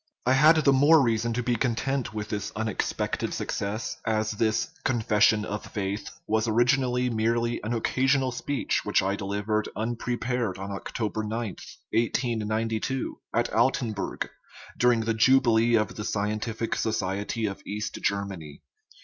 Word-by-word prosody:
I 130 - +4
had 150 +5 +7
the 145 -3 +4
more 145 +4 +6
rea 115 -5 +2
son 115 +1 -1
to 125 +2 -1
be 120 0 +1
content 130 +2 -1
with 105 -1 -5
this 105 -2 -3
unexpected 110 0 -2
success, 105 +3 -3
as 110 -1 0
this 110 +1 0
" - - -32
confession 110 -3 +3
of 105 0 -4
faith 100 0 -3
" - - -34
was 110 +1 +1
originally 125 +2 +2
merely 115 +1 0
an 110 +3 -2
occa 130 +3 0
sional 135 -2 +2
speech 140 +3 -1
which - - +2
I 95 +1 0
delivered 105 +2 -2
unprepared 120 -1 -2
on 100 +1 -6
October 110 +2 -3
9, 110 +2 -3 0.6
1892, 115 +1 -1
at - - 0
Altenburg, 115 -3 0 0.5
during 120 -2 +3
the 115 0 0
jubilee 120 -1 +4
of 110 -2 +1
the - - -5
Scien 105 0 -1
tific 115 0 -2
Society 105 +1 -1
of 100 -2 -4
East 105 +1 -4
Germany. 95 -8 -3
110 Hz, 150 wpm, -27 LUFS, 105-120 Hz, 0.6 s, had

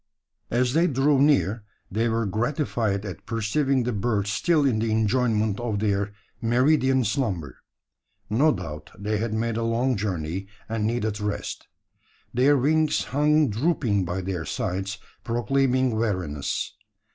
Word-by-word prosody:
As 125 +1 +1
they 165 +3 +4
drew 135 0 +3
near, 120 -7 +3 0.3
they 115 +4 +1
were 115 0 0
gratified 110 -2 -1
at 95 - -8
perceiving 125 +4 +1
the 125 0 -1
birds 105 -1 0
still 160 0 +2
in 120 -5 +2
the 115 0 0
enjoyment 110 -1 +1
of 120 -4 -2
their 100 -1 0 0.3
meridian 130 +2 +3
slumber. 100 - -2 0.7
No 140 +9 +3
doubt - - -6
they 105 +1 -1
had 115 0 -2
made 115 +1 -1
a 115 - -1
long 120 +3 +1
journey, 95 -2 -3 0.2
and 110 -1 -1
needed 110 -2 -1
rest. 105 0 -4 0.7
Their 135 +4 +4
wings 155 +4 +2
hung 150 -1 +2
drooping 115 - +1
by 90 +2 -3
their 90 -3 -3
sides, 95 +5 -3 0.3
proclaiming 130 +1 +1
weariness. 90 -10 -2
115 Hz, 135 wpm, -25 LUFS, 100-130 Hz, 0.7 s, they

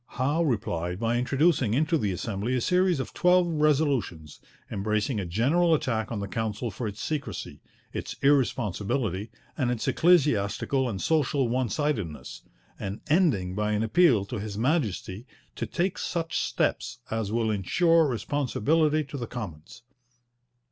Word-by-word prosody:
Howe 145 +6 +1
replied 90 - -1
by 115 +1 0
introducing 130 -2 +2
into 155 +4 +2
the 105 -10 0
Assembly 100 +6 -2
a - - +1
series 180 +1 +2
of 130 - -5
twelve 180 0 +4
resolutions, 145 - 0 0.3
embracing 105 +4 -1
a 95 - -3
general 155 - +3
attack 115 -8 -2
on 110 - -2
the 100 - -4
Council 110 +2 -3
for 110 +4 -4
its 105 0 -7
secrecy, 110 - -4 0.3
its - - -5
irresponsibility, 115 -6 +1 0.3
and 130 -5 0
its 120 0 -2
ecclesiastical 130 - +2
and 100 -4 -4
social 145 -3 +1
one 125 0 0
sidedness, 95 - -3 0.4
and 100 +1 -5
ending 145 - +2
by 105 +2 -1
an 105 +1 +1
appeal 115 - +4
to 110 +2 -5
His 100 0 -5
Majesty 115 - -1 0.3
'to - - -3
take 185 +1 -1
such 165 -2 -3
steps - - -1
as 110 -2 -2
will 115 -1 +1
ensure 165 - +3
responsibility 145 +4 +1
to 140 0 -8
the 120 -3 -4
Commons.' 100 0 -8
120 Hz, 145 wpm, -27 LUFS, 105-150 Hz, 0.4 s, twelve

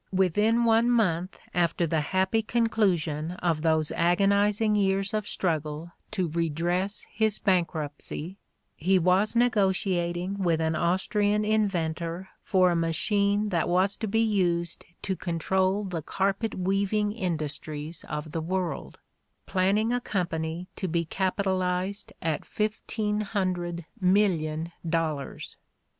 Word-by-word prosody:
"Within 210 +5 +2
one 230 +1 +4
month 185 -6 +1
after 170 0 +1
the 160 -1 0
happy 190 +7 +1
conclusion 185 -9 0
of 170 -4 -1
those 160 -1 +2
agonizing 200 +4 +2
years 195 0 +1
of 215 -1 -1
struggle 155 -1 -2 0.2
to 185 -2 -1
re 165 +1 0
dress 175 +6 -1
his 220 -1 +1
bankruptcy, 170 -1 -1 0.4
he 185 +4 +2
was 185 +5 +2
negotiating 190 -5 +1
with 170 -4 +1
an 160 0 0
Aus 175 +4 +1
trian 210 0 +1
inventor 180 -4 -1
for 185 -2 +3
a - - +1
machine 200 +5 +1
that 170 -4 0
was 185 +3 +2
to 220 - -3
be 225 +3 +2
used 175 -6 0 0.2
to 190 - -1
control 190 +3 0
the 180 -5 -4
carpet 195 +7 -1
weaving 200 +3 0
industries 155 -5 -3
of 150 0 -4
the 165 - -2
world, 175 -2 -3 0.5
planning 200 +5 +1
a 245 - 0
company 170 -4 -2
to 190 - -2
be 170 0 0
capitalized 190 +1 -1
at 160 -2 -1
fifteen 215 0 -2
hundred 180 -5 -2
million 170 -5 +1
dollars. 160 -4 -3
185 Hz, 125 wpm, -27 LUFS, 165-205 Hz, 0.5 s, one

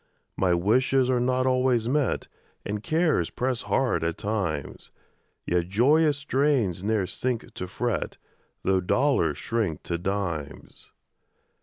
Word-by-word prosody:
My 90 -2 +2
wishes 125 +8 +2
are 125 - +2
not 130 +1 +1
always 130 -3 +2
met, 140 0 0 0.4
And 105 0 -3
cares 155 - +1
press 125 -1 -2
hard 130 -9 0
at 85 0 -1
times; 95 -10 -3 0.6
Yet 85 -1 0
joyous 145 +8 +3
strains 135 - +1
ne'er 105 -2 +1
sink 125 +5 -3
to 90 - -5
fret, 120 +3 -2 0.5
Tho' 95 0 +2
dollars 110 - +1
shrink 110 -9 -2
to 85 -1 -3
dimes. 85 -5 -4
115 Hz, 125 wpm, -26 LUFS, 90-130 Hz, 0.6 s, joyous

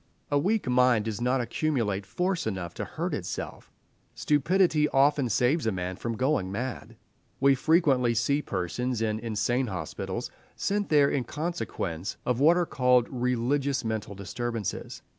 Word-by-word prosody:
A 145 - +3
weak 205 +2 0
mind 125 -3 +3
does 110 0 -3
not 125 +1 +2
accumulate 115 -6 -1
force 180 - -1
enough 95 -5 -4
to - - -4
hurt - - -4
itself; - - -5 0.4
stupidity 150 +1 +2
often 140 -1 +3
saves 125 +6 +2
a - - +2
man 90 -1 -3
from 115 +3 -4
going 130 -8 0
mad. 120 +5 -5 0.4
We 140 +1 +5
frequently 135 -4 +3
see 140 +6 +1
persons 115 +4 -2
in 110 -1 -1
insane 115 +3 0
hospitals, 90 -7 -4 0.2
sent 205 0 -1
there 145 -2 +4
in 130 -3 -1
consequence 100 - -4
of 125 -1 0
what 160 +5 +5
are 175 - +2
called 125 -5 +3
religious 130 +2 0
mental 110 -2 -3
disturbances. 115 +2 -4
125 Hz, 145 wpm, -27 LUFS, 110-145 Hz, 0.4 s, We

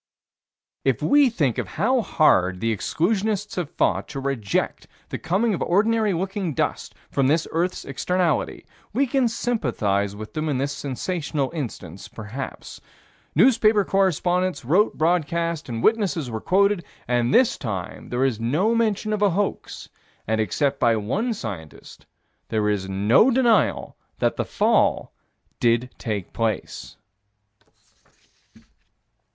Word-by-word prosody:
If - - 0
we 285 -2 +5
think 150 - 0
of - - -3
how 250 +4 +2
hard 95 - +2
the 115 +1 0
exclusionists 205 - -1
have 175 -5 -2
fought - - 0
to 140 - -6
reject 135 -7 -2 0.2
the - - -4
coming 210 +6 +1
of 180 - -3
ordinary 215 +3 +2
looking 190 -2 -2
dust - - -2 0.2
from 135 -2 +2
this 155 +3 +2
earth's 175 +3 -1
externality, 170 +2 -1 0.3
we 270 +6 +2
can 265 -1 +1
sympathize 115 - -1
with 110 +1 -9
them 155 0 -2
in 140 - 0
this 140 +2 -1
sensational 145 0 -3
instance, 100 - -6
perhaps. 115 +5 -8 0.5
Newspaper 215 - +4
correspondents 180 -4 +1
wrote 185 - +2
broadcast 170 -1 0
and 115 -1 -4
witnesses 190 - +1
were 110 -1 -4
quoted, 200 -1 +2 0.2
and 120 0 +1
this 250 - +4
time 100 -8 -6
there 125 +2 +1
is 125 -5 -1
no 155 - +1
mention 215 -2 0
of 210 - -2
a 205 - +5
hoax, 195 +3 -3 0.4
and, 110 0 0
except 140 +6 0
by 120 -2 +3
one 130 - -1
scientist, 100 - -8 0.4
there 105 -2 +1
is 95 -2 -1
no 105 - +4
denial 240 -4 +2 0.2
that - - +1
the - - -2
fall - - +1 0.5
did 120 +2 +1
take 105 -6 -4
place. 115 -1 -3
160 Hz, 135 wpm, -23 LUFS, -, 0.5 s, we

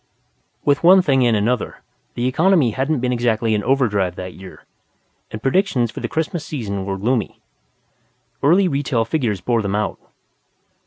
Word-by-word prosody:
With 145 +1 +2
one 185 +2 +7
thing 135 -5 +2
and 115 - +2
another, 115 +3 -2 0.3
the 120 - -2
economy 155 0 +3
hadn't 135 +3 -1
been 125 0 0
exactly 115 -2 0
in 105 - +1
overdrive 105 -9 +1
that 90 0 -7
year, 95 0 -13 0.6
and 110 +1 -8
predictions 135 - +1
for - - -8
the - - -3
Christmas 160 0 -3
season 100 -9 -5
were 95 0 -2
gloomy. 115 +3 -1 1.0
Early 180 +7 +4
retail 135 -6 0
figures 115 - -1
bore 115 +4 0
them 100 -1 -2
out. 105 0 -2
125 Hz, 155 wpm, -20 LUFS, 105-145 Hz, 1.0 s, one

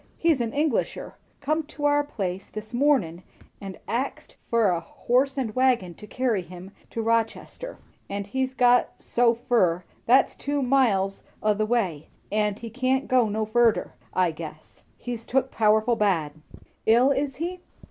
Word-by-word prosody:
He's 325 -6 +2
an 230 -1 -1
Englisher 295 +3 -1 0.3
come 310 +3 +1
to 295 -1 -5
our 290 0 +4
place 195 -9 -4
this 215 +2 -8
mornin' 240 - +2 0.4
and 195 -2 -7
axed 255 +4 -3
fur 230 -3 +3
a 170 - 0
horse 260 +9 0
and 240 -5 -2
wagon 250 -8 +2
to 210 - -13
carry 240 -4 0
him 180 +2 -11 0.2
to 225 - -3
Rochester; 230 - -2 0.3
and 200 0 -3
he's 260 +5 -2
got 245 -1 +4
so 235 -1 +2
fur, 185 -8 +1 0.2
that's 260 +3 +4
two 285 0 -2
miles 225 -7 +2 0.2
o' 215 0 +4
the 215 +1 -1
way, 190 -11 -1 0.2
and 210 -1 +1
he 230 +1 -7
can't 260 +2 0
go 250 -4 +3
no 215 +1 -1
furder, 230 +1 +2 0.2
I 180 -2 +2
guess. 155 -1 -10 0.2
He's 240 -2 -5
took 265 +2 0
powerful 220 +2 +3
bad." 185 -9 +1 0.6
"Ill, 240 +5 +5
is 275 0 -1
he?" 350 +4 -4
230 Hz, 155 wpm, -25 LUFS, 200-265 Hz, 0.6 s, Ill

